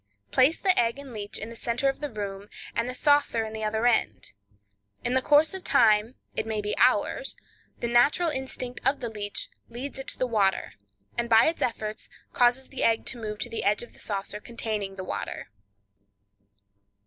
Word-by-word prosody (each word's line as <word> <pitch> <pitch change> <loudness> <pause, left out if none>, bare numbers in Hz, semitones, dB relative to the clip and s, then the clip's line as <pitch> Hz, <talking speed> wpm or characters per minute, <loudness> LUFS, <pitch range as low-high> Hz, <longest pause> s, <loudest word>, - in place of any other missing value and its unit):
Place 275 +6 +4
the 375 -2 +3
egg 235 +1 +2
and 280 -3 -9
leech 205 -2 -5
in 220 +2 -6
the - - -9
center 235 +4 -1
of 270 - 0
the 295 - -3
room, 205 -2 -6 0.2
and 230 +1 0
the 255 - -4
saucer 285 -5 +3
in 220 - -7
the 220 0 -4
other 220 +2 0
end. 105 - +1 0.7
In 245 - 0
the 260 - +3
course 295 +5 +4
of 380 -1 -6
time—it 220 -1 +2
may 220 -1 -1
be 210 0 -2
hours—the - - 0
natural 260 +8 +4
instinct 260 -2 -4
of 275 +2 +2
the 235 - -3
leech 205 -2 -4 0.2
leads 265 +4 -6
it 270 - -6
to - - -2
the 255 - +1
water, 200 - +1 0.5
and 235 0 -1
by 225 0 +7
its 325 +1 0
efforts 215 -2 -2 0.2
causes 245 +2 +3
the 270 - -6
egg 225 -1 +3
to 240 - -3
move 210 -1 -4
to 240 - -3
the 230 - -3
edge 205 +3 +2
of 240 - -13
the - - -15
saucer 200 0 -3
containing 210 -4 -4
the 190 - -6
water. 180 - -5
235 Hz, 190 wpm, -27 LUFS, 215-260 Hz, 0.7 s, by